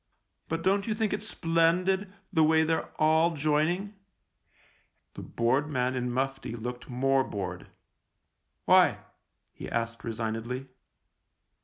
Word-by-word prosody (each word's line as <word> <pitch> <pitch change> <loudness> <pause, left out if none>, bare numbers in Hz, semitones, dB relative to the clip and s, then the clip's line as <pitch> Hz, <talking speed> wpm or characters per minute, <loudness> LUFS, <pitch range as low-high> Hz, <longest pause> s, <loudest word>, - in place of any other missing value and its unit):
But 165 +1 -3
don't 195 +2 +2
you 215 - 0
think 215 -1 0
it's 205 +1 -3
splendid, 180 +3 +1 0.2
the 160 -3 +4
way 160 +1 +4
they're 160 0 -1
all 160 +2 +3
joining? 155 +7 0 0.6
" - - -36
The - - -8
bored 130 +6 0
man 130 -3 0
in 125 -1 -2
mufti 135 -1 -2
looked 125 +3 -6
more 135 +2 +2
bored. 100 -6 -5 0.5
" - - -51
Why? - - +5 0.3
" - - -51
he - - -8
asked 115 0 -3
resignedly. 115 +3 -4
150 Hz, 135 wpm, -28 LUFS, 125-165 Hz, 0.6 s, Why